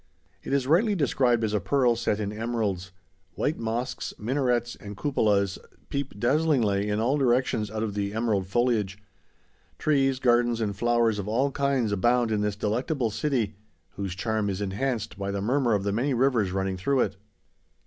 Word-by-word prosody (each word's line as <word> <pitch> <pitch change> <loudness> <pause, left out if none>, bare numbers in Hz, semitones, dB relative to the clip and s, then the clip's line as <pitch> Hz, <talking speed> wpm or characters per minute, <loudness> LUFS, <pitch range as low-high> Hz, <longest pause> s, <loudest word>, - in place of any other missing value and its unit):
It - - -7
is 140 -2 +2
rightly 195 - +3
described 125 -7 +2
as 110 -1 0
a 105 - +2
pearl 125 +3 +2
set 115 -2 -1
in 105 -1 -3
emeralds. 105 -5 -2 0.4
White 150 - -1
mosques, 115 +3 -3
minarets, 120 0 0
and 100 -1 -9
cupolas 105 - +1 0.3
peep 140 -7 -4
dazzlingly 120 -7 +2
in 105 +1 0
all 130 +6 +1
directions 120 -4 +1
out 110 +1 -3
of 105 -2 -2
the 100 -1 -2
emerald 110 -4 0
foliage. 105 -3 +1 0.8
Trees, 135 -3 +2
gardens, 120 -2 +2
and 105 -3 -1
flowers 120 0 +2
of 100 - -4
all 130 +6 +1
kinds 135 -5 0
abound 120 +3 +2
in 105 -1 +1
this 105 -1 -1
delectable 115 +4 -1
city, 115 -6 -1 0.3
whose 95 -2 -5
charm 110 +1 -1
is 95 -1 -3
enhanced 110 +2 -2
by 100 0 -2
the 100 0 -2
murmur 120 +2 +2
of 100 - -1
the 100 - 0
many 130 +5 0
rivers 120 -6 +2
running 95 0 -1
through 135 +7 +1
it. - - 0
115 Hz, 170 wpm, -26 LUFS, 105-130 Hz, 0.8 s, rightly